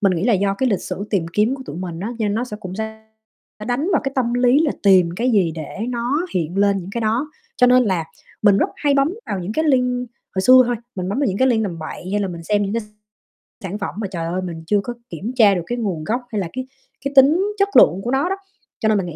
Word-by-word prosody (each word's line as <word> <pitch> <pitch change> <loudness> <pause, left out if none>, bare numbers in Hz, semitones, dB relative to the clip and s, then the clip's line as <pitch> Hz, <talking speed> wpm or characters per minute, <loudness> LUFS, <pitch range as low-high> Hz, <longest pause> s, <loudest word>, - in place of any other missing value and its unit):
mình 195 -3 +3
nghĩ 170 +4 -1
là 235 - +3
do 195 0 +1
cái 260 +5 0
lịch 200 - 0
sử 200 - -4
tìm 185 -6 0
kiếm 220 +5 +2
của 265 - -8
tụi 150 - -7
mình 175 -2 -5
á, 205 - -3
cho 220 - 0
nên 205 0 0
nó 235 - -1
sẽ 210 -4 -7
cũng 185 0 -7
sẽ 220 0 -6 0.6
đánh 265 +8 -1
vào 310 - +3
cái 270 - -2
tâm 245 -2 0
lý 245 +3 +4
là 310 -3 +2
tìm 185 -4 +5
cái 245 +3 +1
gì 185 -7 +2
để 155 0 -7
nó 250 +8 -1
hiện 175 +1 -1
lên 200 -1 +3
những 185 +1 -7
cái 235 - -3
đó, 235 +7 0 0.3
cho 250 - +5
nên 250 0 +5
là 180 -5 0 0.4
mình 200 -2 +5
rất - - +2
hay 290 -2 +1
bấm 280 +6 +2
vào 195 - -2
những 185 +4 -4
cái 315 +5 0
link 250 -3 +1 0.3
hồi 190 - 0
xưa 255 +4 +8
thôi, 245 -1 0 0.2
mình 185 -1 -4
bấm 205 - -2
vào 285 - +2
những 195 -1 -1
cái 260 - +4
link 220 -3 +2
tầm 170 -4 -4
bậy, 170 +3 -7
hay 205 - +1
là 195 - -1
mình 170 -2 -7
xem 205 +3 +1
những 200 - -2
cái 230 0 -1 0.8
sản 190 +2 -4
phẩm 200 - -5
mà, 210 -2 -2
trời 170 -2 -3
ơi, 180 +3 -2
mình 165 -3 -6
chưa 205 -1 +3
có 240 - -4 0.2
kiểm 185 +9 -5
tra 210 -5 +5
được 175 - -1
cái 240 - -3
nguồn 190 -9 -2
gốc 235 +9 -1
hay 210 - -1
là 170 - -4
cái 255 0 -5 0.4
cái 275 - -2
tính 295 +8 +6
chất 400 0 +2
lượng 190 +3 +6
của 240 - -2
nó 275 +7 +1
đó. 385 - 0 0.4
Cho 220 - +1
nên 215 - +3
mình 190 - -1
nghĩ 160 - -7
215 Hz, 285 wpm, -20 LUFS, 185-250 Hz, 0.8 s, xưa